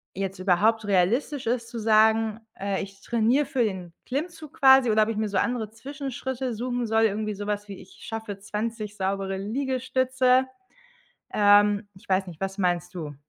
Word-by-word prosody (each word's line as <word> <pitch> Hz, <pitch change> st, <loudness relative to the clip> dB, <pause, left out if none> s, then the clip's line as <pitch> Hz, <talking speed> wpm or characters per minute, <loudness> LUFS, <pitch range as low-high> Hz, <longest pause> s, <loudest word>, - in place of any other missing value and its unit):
jetzt 195 Hz, 0 st, -4 dB
überhaupt 210 Hz, +4 st, +2 dB
realistisch 225 Hz, -, +1 dB
ist 235 Hz, -1 st, -1 dB
zu 235 Hz, -2 st, -6 dB
sagen, 220 Hz, 0 st, +3 dB, 0.2 s
äh, 195 Hz, -1 st, -1 dB
„ich 195 Hz, 0 st, -12 dB
trainiere 240 Hz, +5 st, +2 dB
für 250 Hz, -3 st, 0 dB
den 185 Hz, -5 st, -4 dB
Klimmzug 310 Hz, +2 st, -5 dB
quasi,” 265 Hz, -3 st, +7 dB
oder 215 Hz, 0 st, +4 dB
ob 220 Hz, -, -2 dB
ich 220 Hz, -, -3 dB
mir 215 Hz, -1 st, -1 dB
so 195 Hz, -, -1 dB
andere 230 Hz, -1 st, 0 dB
Zwischenschritte 265 Hz, 0 st, -5 dB
suchen 245 Hz, 0 st, -2 dB
soll, 225 Hz, +1 st, +2 dB
irgendwie 215 Hz, 0 st, -1 dB
sowas, 205 Hz, 0 st, -3 dB
wie 195 Hz, -, -8 dB
„ich 185 Hz, -, -15 dB
schaffe 220 Hz, -3 st, -6 dB
20 210 Hz, +1 st, -4 dB
saubere 195 Hz, 0 st, -2 dB
Liegestütze.” 260 Hz, +3 st, +1 dB, 0.9 s
Ähm, 205 Hz, 0 st, +4 dB
ich 185 Hz, -, -19 dB
weiß 190 Hz, 0 st, +1 dB
nicht, 165 Hz, -1 st, -11 dB
was 195 Hz, +1 st, -4 dB
meinst 175 Hz, -1 st, 0 dB
du? 155 Hz, -4 st, -6 dB
215 Hz, 165 wpm, -26 LUFS, 195-245 Hz, 0.9 s, quasi